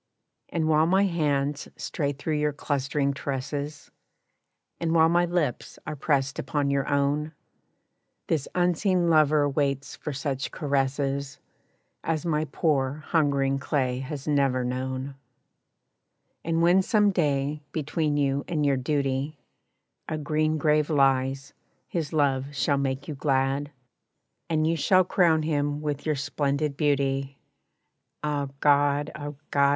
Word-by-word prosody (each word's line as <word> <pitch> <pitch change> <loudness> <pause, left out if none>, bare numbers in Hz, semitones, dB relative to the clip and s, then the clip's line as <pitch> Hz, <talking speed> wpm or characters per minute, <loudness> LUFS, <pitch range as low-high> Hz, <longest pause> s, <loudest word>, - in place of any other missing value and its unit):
And 160 -2 -1
while 155 0 +4
my 190 +3 +4
hands 145 -6 0
stray 145 -2 -2
through 145 +2 -2
your 150 0 +1
clustering 140 0 -1
tresses, 140 +2 -4 0.9
And 165 0 0
while 160 0 +6
my 175 +1 +3
lips 170 -8 -2
are 155 - -4
pressed 140 -1 0
upon 145 -2 -1
your 140 -1 0
own, 145 +2 0 0.9
This 155 -4 -1
unseen 180 0 +2
lover 155 -2 +4
waits 140 -1 -1
for 150 - -5
such 135 -1 -3
caresses 140 -1 -1 0.7
As 165 0 -1
my 155 -2 +1
poor 145 -1 0
hungering 140 -4 +2
clay 130 -3 -1
has 140 +1 -6
never 135 -4 +2
known, 130 +2 -3 1.3
And 165 0 +1
when 175 +3 +5
some 210 0 +3
day, 150 -4 0
between 150 -1 -1
you 140 -1 +1
and 150 -3 0
your 140 -2 +3
duty 140 +1 -1 0.7
A 155 - -2
green 155 +1 0
grave 150 0 +2
lies, 135 -1 +1 0.3
his 160 -4 -3
love 140 -2 0
shall 140 0 +1
make 135 0 -2
you 155 - -4
glad, 135 0 0 0.8
And 155 -1 +1
you 165 +1 +2
shall 185 +4 +4
crown 170 -3 +3
him 145 -1 0
with 150 0 -3
your 155 - +2
splendid 140 0 -1
beauty 140 -1 0 0.9
Ah, 145 -2 -1
God! 145 0 +3
ah, 145 -1 -6 0.2
God! 140 -1 +4
145 Hz, 130 wpm, -26 LUFS, 140-155 Hz, 1.3 s, while